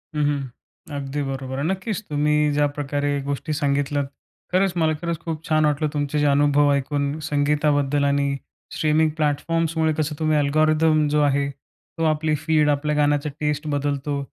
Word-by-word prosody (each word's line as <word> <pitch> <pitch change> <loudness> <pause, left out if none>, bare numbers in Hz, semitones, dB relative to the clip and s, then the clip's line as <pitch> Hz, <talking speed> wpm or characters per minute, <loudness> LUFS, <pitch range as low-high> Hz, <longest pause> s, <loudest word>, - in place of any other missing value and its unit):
हं, 150 - +1
हं. 145 -2 -1 0.5
अगदी 140 +1 -3
बरोबर 135 -1 -4
आहे. - - -1
नक्कीच, 190 +3 -2
तुम्ही 150 0 +2
ज्या 145 0 +3
प्रकारे 145 0 -1
गोष्टी 140 +2 -3
सांगितल्यात, 145 -1 0 0.5
खरंच 185 0 +2
मला 160 -2 +2
खरंच 170 -1 -2
खूप 165 -2 -5
छान 155 -1 +3
वाटलं 150 +1 +1
तुमचे, 145 0 -1
जे 145 - +2
अनुभव 145 0 +4
ऐकून 140 +1 -1
संगीताबद्दल 145 -1 +1
आणि 140 0 +1 0.4
स्ट्रीमिंग 155 +1 +2
प्लॅटफॉर्म्समुळे 160 +1 0
कसं 155 -1 -1
तुम्ही 155 -1 +2
अल्गोरिदम 155 +1 +3
जो 150 0 +2
आहे, 140 -1 +2
तो 140 +4 -10
आपली 155 0 +1
फीड, 150 0 +2
आपल्या 150 +1 0
गाण्याचा 145 0 +1
टेस्ट 150 0 -1
बदलतो. 145 0 -1
150 Hz, 155 wpm, -23 LUFS, 145-155 Hz, 0.5 s, अनुभव